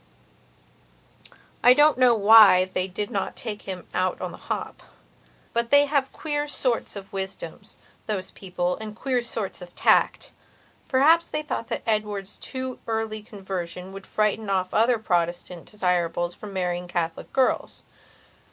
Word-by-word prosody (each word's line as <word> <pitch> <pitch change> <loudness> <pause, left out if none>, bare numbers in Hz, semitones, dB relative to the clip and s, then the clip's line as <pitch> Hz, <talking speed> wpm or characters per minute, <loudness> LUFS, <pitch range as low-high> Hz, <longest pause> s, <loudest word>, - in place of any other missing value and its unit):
I 250 +1 +8
don't 295 -1 +5
know 250 -2 +6
why 205 -3 +7
they 185 0 -2
did 200 +2 -5
not 195 - -2
take 210 -4 -6
him 185 -2 -6
on 185 0 -1
the - - -9
hop; - - -5 0.7
but 235 0 0
they 285 0 +6
have 280 -2 0
queer 295 -1 -2
sorts 250 -7 -1
of 195 -1 -9
wisdoms, 195 0 -7 0.3
those 195 -3 -3
people, 180 -2 -3
and 215 -1 -8
queer 250 +1 0
sorts 225 -5 -5
of 175 0 -11
tact. - - +2 0.6
Perhaps 320 +6 +4
they 305 0 -3
thought 265 -6 -4
that - - -4
Edward's 210 -2 -2
too 260 -1 -5
early 220 -1 -2
conversion 190 -4 -6
would 195 -1 -10
frighten 215 0 0
off 185 -1 0
other 230 +2 +3
Protestant 175 -3 -2
desirables 175 -3 0
from 210 +2 -10
marrying 180 -2 -2
Catholic 170 -2 -3
girls. 260 -1 0
210 Hz, 145 wpm, -25 LUFS, 185-240 Hz, 0.7 s, I